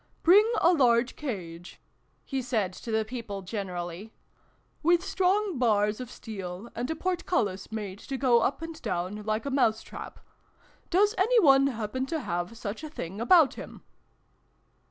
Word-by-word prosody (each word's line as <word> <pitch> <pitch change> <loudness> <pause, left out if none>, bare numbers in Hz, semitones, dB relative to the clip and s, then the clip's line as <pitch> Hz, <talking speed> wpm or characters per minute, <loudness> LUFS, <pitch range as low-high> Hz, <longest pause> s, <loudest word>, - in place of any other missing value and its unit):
" - - -40
Bring 415 +7 +6
a 350 - +5
large 245 -4 +3
cage," 175 - -6 0.5
he 270 -2 -2
said 220 -7 -1
to 230 - -9
the 220 -1 +1
people 220 -4 -6
generally, 185 0 -5 0.3
" - - -40
with 345 +2 +3
strong 380 -3 +1
bars 210 -3 +2
of 250 -2 -6
steel, 195 -2 -7
and 245 +2 -4
a 320 - -1
portcullis 320 - -1
made 205 -3 -5
to 270 - -5
go 250 -3 +4
up 270 +7 -1
and 325 -1 -7
down 180 +4 -3
like 215 +2 -2
a 280 - -2
mouse 225 -5 +2
trap! - - -9 0.7
Does 410 +4 +3
any 460 +5 +4
one 275 -6 +6
happen 255 +1 -3
to 320 +3 -2
have 175 +4 -3
such 220 +5 -5
a 310 - -5
thing 200 - -6
about 315 +3 +5
him - - -10
235 Hz, 165 wpm, -28 LUFS, 205-310 Hz, 0.7 s, Bring